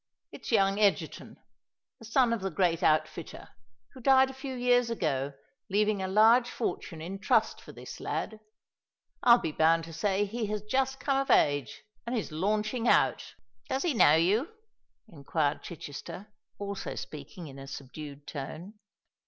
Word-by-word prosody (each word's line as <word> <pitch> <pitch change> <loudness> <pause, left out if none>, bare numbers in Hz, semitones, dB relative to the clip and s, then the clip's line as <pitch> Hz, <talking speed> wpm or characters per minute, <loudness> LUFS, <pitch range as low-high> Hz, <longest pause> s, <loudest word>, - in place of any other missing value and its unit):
It's - - -8
young 195 -2 +3
Egerton—the 210 +2 -3
son 235 +1 +3
of 230 - -2
the 195 - -2
great 170 -1 +1
outfitter, 155 0 0 0.4
who 260 - -12
died 265 +1 +5
a - - -12
few 265 0 -6
years 245 -1 +3
ago, 145 - -1 0.4
leaving 210 0 +1
a 190 - -2
large 225 +5 +5
fortune 165 -9 -4
in 190 +4 -6
trust - - +1
for - - -12
this - - -10
lad. 220 - -4 0.8
I'll 240 -1 +7
be 160 - -3
bound 165 +2 +3
to 165 0 -9
say 195 +4 0
he 220 +2 -3
has 210 0 -3
just 265 +4 0
come 275 0 0
of 275 - -2
age, 145 -5 +2 0.2
and 245 +1 -1
is 210 - -4
launching 215 +8 -1
out." 130 - +2 0.3
"Does 265 - -1
he 345 -4 +1
know 155 - +6
you?" 200 - +2 0.6
inquired 150 -3 -2
Chichester, 175 +5 -9 0.2
also 200 -1 -5
speaking 155 +4 -8
in 135 -2 -10
a 135 - -9
subdued 140 +1 -9
tone. 165 +9 -7
200 Hz, 155 wpm, -29 LUFS, 160-235 Hz, 0.8 s, I'll